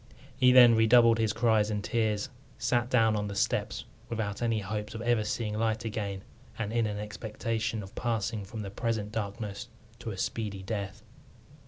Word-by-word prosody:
He 125 0 +5
then 125 -2 +9
redoubled 115 +1 +5
his 110 -2 +2
cries 110 -2 +2
and 105 -1 -2
tears, 110 -4 0 0.3
sat 120 0 +1
down 115 -4 +4
on 105 0 -1
the 100 - -5
steps - - -1 0.2
without 110 -2 -3
any 115 -2 +1
hopes 105 +3 -4
of 110 - -5
ever 120 -2 +2
seeing 105 0 -2
light 110 +1 0
again, 100 -3 -3 0.3
and 110 -1 -3
in 115 -2 +2
an 105 -1 -3
expectation 110 +1 -3
of 95 - -11
passing 110 -2 -2
from 110 +3 -7
the 100 -2 -6
present 110 -1 -2
darkness 105 +2 -4 0.3
to - - -5
a 100 - -5
speedy 100 -1 -3
death. 105 +1 -4
110 Hz, 175 wpm, -29 LUFS, 105-115 Hz, 0.3 s, then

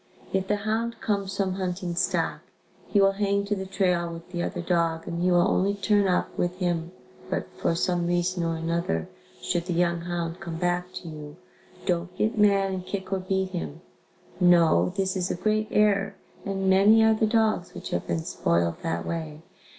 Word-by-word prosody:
If 190 0 0
the 210 - +2
hound 220 +3 -2
comes 200 -2 -2
from 190 -2 0
hunting 180 -1 -3
stock, 175 +2 0 0.5
he 205 - +2
will 195 0 +5
hang 200 0 0
to 205 +1 0
the 190 -1 -5
trail 180 -3 +1
with 165 +1 -10
the 175 -1 -2
other 180 +1 -3
dog 170 -2 0
and 170 0 -3
he 180 - +3
will 175 +1 +4
only 200 +1 +1
turn 205 0 +2
up 180 - 0
with 175 +1 -1
him 175 -2 -1 0.4
but - - -2
for 165 - +1
some 175 0 0
reason 175 0 0
or 165 0 0
another, 165 - -1 0.4
should 175 -1 -1
the 180 - -1
young 170 0 +1
hound 170 0 -3
come 170 -4 -6
back 180 +1 -1
to 175 - -7
you, 150 -2 -8 0.5
"don't 180 0 -1
get 220 - +1
mad 200 -2 +3
and 185 -1 -3
kick 195 -1 -4
or 190 - 0
beat 190 0 -1
him." 170 -3 -5 0.6
No, 175 -1 +5
this 190 -1 0
is 185 -1 -1
a - - -1
great 215 +3 0
error 200 -2 +2 0.3
and 195 -1 -1
many 200 +4 +6
are 220 0 +5
the 220 0 +1
dogs 220 -5 +1
which - - -7
have 85 - -2
been 80 -1 -1
spoiled 85 0 0
that 85 0 -2
way. 160 -2 -5
180 Hz, 195 wpm, -26 LUFS, 170-195 Hz, 0.6 s, many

